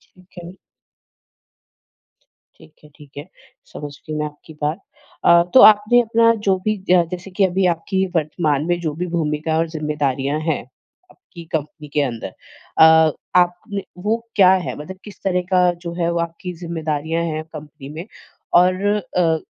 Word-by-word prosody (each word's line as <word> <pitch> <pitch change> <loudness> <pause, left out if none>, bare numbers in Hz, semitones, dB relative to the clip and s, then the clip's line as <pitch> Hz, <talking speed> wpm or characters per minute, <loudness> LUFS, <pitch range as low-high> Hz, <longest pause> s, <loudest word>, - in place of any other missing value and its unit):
ठीक 185 0 -23
है। 175 - -9 2.2
ठीक 155 - -30
है, 150 - -16
ठीक 145 -3 -16
है, 145 - -6 0.5
समझ 145 -1 -7
गई 155 - -4
मैं 150 - -1
आपकी 150 +1 -11
बात। 150 +3 -1 0.5
अ, 170 0 +6
तो 260 - +8
आपने 215 +3 +7
अपना 230 0 +3
जो 190 -1 +4
भी 215 -1 +1
ज 180 -1 +5
जैसे 180 +2 -7
कि 195 +1 +2
अभी 185 +1 0
आपकी 190 +3 -2
वर्तमान 155 -2 0
में 175 0 0
जो 155 -3 -2
भी 180 +2 -3
भूमिका 160 -2 -1
और 165 +1 +1
ज़िम्मेदारियाँ 150 -2 -2
हैं, 160 -1 -1 0.5
आपकी 170 - -14
कंपनी 150 0 -4
के 150 - +2
अंदर 115 -8 -4 0.5
अ, 160 -1 +7 0.2
आपने 180 +3 +1 0.2
वो 220 +2 +1 0.2
क्या 190 -3 +6
हैं? 185 -2 -2
मतलब 185 +6 -8
किस 205 - -13
तरह 180 -2 +1
का 180 -1 +4
जो 170 0 -8
है, 170 0 +1
वो 170 - -1
आपकी 170 +2 -5
ज़िम्मेदारियाँ 165 -1 -3
हैं 155 -1 -3
कंपनी 150 -2 -10
में 165 +4 -7 0.5
और 185 +2 +2 0.3
अ, 165 -3 +2
170 Hz, 165 wpm, -20 LUFS, 150-185 Hz, 2.2 s, तो